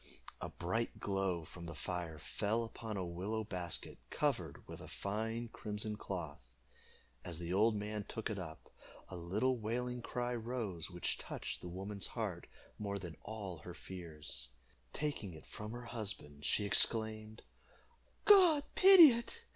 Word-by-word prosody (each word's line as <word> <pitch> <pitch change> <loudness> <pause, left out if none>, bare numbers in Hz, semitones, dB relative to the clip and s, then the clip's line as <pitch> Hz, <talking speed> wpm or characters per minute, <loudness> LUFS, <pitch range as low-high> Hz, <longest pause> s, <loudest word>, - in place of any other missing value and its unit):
A - - -3
bright 115 +7 -2
glow 95 -4 0
from 85 +2 -9
the 85 - -6
fire 85 -1 -3
fell 110 +8 0
upon 110 -2 -5
a 95 - -1
willow 95 +6 -2
basket, 90 -5 -3
covered - - -1
with - - -8
a - - -8
fine 115 +3 -2
crimson 105 -1 -3
cloth. 90 -8 -4 0.8
As 85 -2 -5
the 85 +1 -3
old 110 +3 +5
man 105 0 -2
took 110 - -3
it 100 - -2
up, 80 -3 -8 0.4
a 95 - -6
little 105 +9 +1
wailing 125 +3 -1
cry 125 +1 -2
rose, 115 -8 -3
which 90 -1 -2
touched - - -5
the 90 - -6
woman's 95 +3 -3
heart - - -3 0.3
more 100 -1 -1
than 85 -4 -6
all 100 -6 -5
her 85 +3 -8
fears. 75 -10 -8 0.4
Taking 140 - -2
it 80 - -12
from 105 0 -7
her 120 +1 -6
husband, 95 -11 -4
she 105 - +2
exclaimed 110 +1 +2 0.8
"God 360 -8 +8
pity 370 -6 +11
it! 240 - -3
105 Hz, 150 wpm, -37 LUFS, 90-115 Hz, 0.8 s, pity